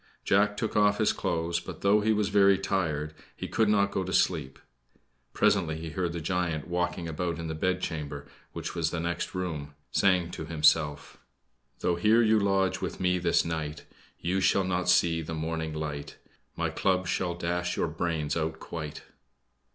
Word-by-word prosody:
Jack 105 +1 +3
took 110 - -2
off 105 -1 +4
his 110 - +2
clothes; 85 0 -1
but, 85 - -9
though 100 +2 +4
he 110 +1 +2
was 105 -2 +1
very 100 -1 +5
tired, 80 -6 -1 0.2
he - - -4
could 110 -2 +2
not 100 -1 +3
go 95 - -1
to 95 - -5
sleep. 70 -9 +1 0.7
Presently 85 -6 +2
he 80 0 -6
heard 90 0 -1
the 85 - -4
giant 85 -3 -1
walking 90 -1 -1
about 85 +1 -2
in 85 - -5
the 80 - -3
bedchamber, 80 -4 -2 0.3
which - - -5
was 80 -2 0
the 85 - -3
next 85 +2 -3
room, 75 -6 -4 0.2
saying 90 -3 +2
to - - -6
himself: 75 -2 +2 0.6
"Though 85 - +1
here 110 +6 +4
you 110 -1 +4
lodge 95 -2 +1
with - - -4
me 90 0 +2
this 85 -1 +2
night; 80 -2 -4 0.3
You 95 +3 0
shall 95 +1 +3
not 90 -1 -1
see 85 -2 +4
the 80 +1 -5
morning 80 0 -3
light; 75 -2 -5 0.4
My - - -1
club 95 -1 +1
shall 90 -1 -1
dash 90 +1 -2
your - - +1
brains 80 -2 -2
out 80 -1 -2
quite." 75 -3 -6
85 Hz, 175 wpm, -28 LUFS, 80-95 Hz, 0.7 s, very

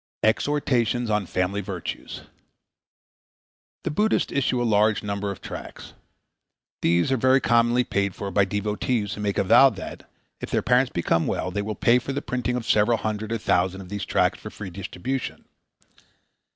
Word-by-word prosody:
Exhortations 120 -1 +1
on 105 -3 0
Family 90 +3 -1
Virtues_ 95 -3 -6 1.6
The - - -2
Buddhists 210 +8 +1
issue 130 -2 +1
a 120 - 0
large 110 -1 +2
number 100 0 -3
of 100 - -6
tracts. - - -9 0.9
These 85 +9 +2
are 130 - +3
very 130 +2 +4
commonly 120 0 +3
paid 100 -4 -1
for 100 -1 -5
by 100 +1 +3
devotees 105 +2 -1
who 105 - -6
make 100 -1 -1
a - - +3
vow 135 +8 +7
that, 95 -7 -9 0.3
if - - -6
their - - 0
parent 125 +1 +2
becomes 85 -1 +1
well, 90 - -2
they 100 +2 -2
will 105 +1 -4
pay 120 +2 +4
for 135 +2 -5
the 140 - -2
printing 125 0 -2
of 125 -2 -3
several 110 +1 +3
hundred 110 0 -3
or 115 - 0
thousand 95 -2 0
of 90 - -11
these 100 0 -4
tracts - - +1
for - - -8
free 100 -3 -8
distribution. 100 +8 -5
105 Hz, 170 wpm, -24 LUFS, 100-125 Hz, 1.6 s, vow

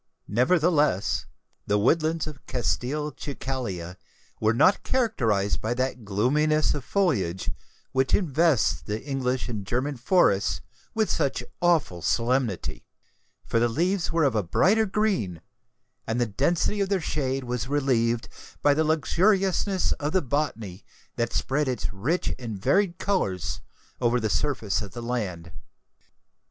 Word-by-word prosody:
Nevertheless, 145 - +2 0.4
the 105 - +2
woodlands 155 +8 +2
of 150 -4 -9
Castelcicala 130 - -3 0.4
were 110 +1 +3
not 185 +11 +4
characterised 115 - 0
by 115 +3 -1
that 130 -1 -2
gloominess 145 +10 +2
of 145 - -4
foliage 120 - 0 0.4
which 130 -1 +2
invests 150 - +2
the 105 +9 -4
English 130 -3 -1
and 110 -5 -4
German 125 +7 -2
forests 100 - +2 0.4
with 220 -1 +2
such 140 - 0 0.2
awful 165 - +2
solemnity; 115 - 0 0.6
for 115 - +1
the 120 +1 +2
leaves 175 +8 0
were 165 -1 +2
of 140 - +3
a 110 - +2
brighter 200 - +3
green, 190 - 0 0.7
and 115 +2 -1
the 120 - +3
density 145 - 0
of 195 - 0
their 195 -2 +2
shade 135 -4 -2
was 125 0 -3
relieved 120 -5 +1 0.4
by 145 - +5
the 155 +2 +2
luxuriousness 185 +4 +2
of 150 0 -2
the 185 - +3
botany 120 -9 -2 0.3
that 120 0 -1
spread 145 +4 0
its 125 -5 -2
rich 135 - -1
and 115 -5 -5
varied 185 - +2
colours 90 - -1 0.4
over 120 0 +2
the 110 -2 -1
surface 120 -10 0
of 100 -3 -8
the 120 - -6
land. 95 -9 -3
130 Hz, 135 wpm, -26 LUFS, 110-160 Hz, 0.7 s, by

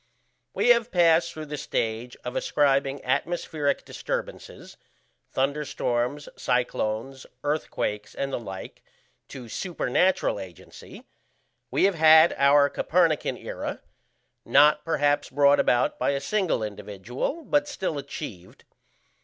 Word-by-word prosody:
We - - +2
have 235 -1 +4
passed 170 -1 +4
through 155 -1 -7
the 150 0 -6
stage 115 -3 -3
of 125 - -5
ascribing 140 -1 +1
atmospheric 150 +1 -1
disturbances - - -6 0.5
thunderstorms, 140 -1 -2
cyclones, 125 +1 -2 0.2
earthquakes, 105 -8 -3
and 135 0 -3
the - - -1
like 95 -5 -9 0.5
to 130 -4 -9
supernatural 190 - 0
agency; - - -12 0.7
we - - +1
have 195 +1 +4
had 160 0 +6
our 140 +1 +5
Copernican 165 +1 +1
era: - - -6 0.6
not 150 +1 +4
perhaps 145 -3 +1
brought 140 +1 +4
about 120 0 +2
by - - +1
a 140 - -1
single 185 - -1
individual, 105 - -5
but 290 0 +1
still 190 - -3
achieved. 115 - -9
145 Hz, 110 wpm, -25 LUFS, 125-165 Hz, 0.7 s, had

